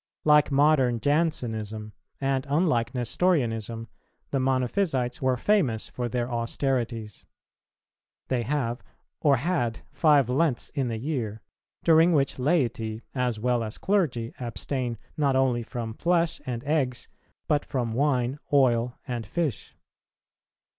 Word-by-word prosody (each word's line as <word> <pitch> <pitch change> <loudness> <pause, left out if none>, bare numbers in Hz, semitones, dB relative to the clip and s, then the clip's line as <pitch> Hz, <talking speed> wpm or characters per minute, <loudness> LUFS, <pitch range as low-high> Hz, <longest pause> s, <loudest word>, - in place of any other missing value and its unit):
Like 150 -1 +5
modern 135 -4 +4
Jansenism, 110 -8 -1 0.3
and 135 0 0
unlike 135 -6 +1
Nestorianism, 115 - 0 0.4
the 135 - +1
Monophysites 130 0 0
were 130 -1 +2
famous 135 - +1
for 120 -1 -3
their 120 +1 -1
austerities. 120 -2 -2 1.0
They 130 -2 0
have, 120 -1 -1 0.4
or 145 -3 +4
had, 130 -6 -1
five 145 -6 +4
Lents 130 0 +1
in 135 -3 -2
the 115 -2 -2
year, 115 -5 -3 0.4
during 165 +1 +5
which 140 -3 +1
laity 120 -7 0
as 125 -4 -1
well 120 0 +1
as 110 -1 -5
clergy 145 - 0
abstain 120 0 -3 0.2
not 140 -3 +2
only 130 -2 +2
from 115 -1 -5
flesh 170 +3 +1
and 120 -1 -3
eggs, 135 -5 0 0.4
but 150 -3 +2
from 120 -5 -2
wine, 130 0 +1
oil, 125 -4 +3
and 120 -2 -3
fish. 150 - -3
125 Hz, 120 wpm, -26 LUFS, 115-145 Hz, 1.0 s, Like